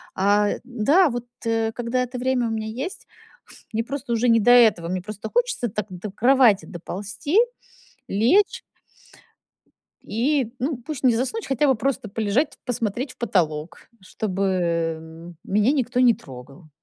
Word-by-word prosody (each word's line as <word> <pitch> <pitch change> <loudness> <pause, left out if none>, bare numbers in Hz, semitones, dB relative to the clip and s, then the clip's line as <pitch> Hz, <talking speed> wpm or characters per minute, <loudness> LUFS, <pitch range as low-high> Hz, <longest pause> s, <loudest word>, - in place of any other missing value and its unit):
А, 205 +2 +3
да, 260 - +3
вот, 240 -1 -4 0.2
э, 225 -1 0
когда 240 +2 -2
это 250 0 -6
время 250 -1 0
у - - -3
меня 220 -1 -3 0.2
есть, 375 - -8 0.7
мне 225 +1 -1
просто 265 -1 -5
уже 235 +2 +1
не 230 -1 +5
до 245 - +3
этого. 225 -9 +5
Мне 185 +1 -2
просто 210 +1 -7
хочется 475 - +1
так 210 +1 -4
до 185 +3 -7
кровати 240 -1 +4
доползти, 205 - -5 0.7
лечь 250 - +2 1.4
и, 250 +1 0
ну, 275 +4 -1
пусть 275 +2 -7
не 245 -3 +4
заснуть, 270 - -2
хотя 270 +2 +1
бы 265 - +4
просто 265 0 -2
полежать, 225 +8 -1
посмотреть 245 +2 -2
в - - -25
потолок, 170 -7 -2
чтобы, 190 +1 -4
эм, 165 -2 -2
меня 210 +6 +2
никто 250 -3 0
не 245 -2 +6
трогал. 135 +4 -13
225 Hz, 150 wpm, -23 LUFS, 195-255 Hz, 1.4 s, не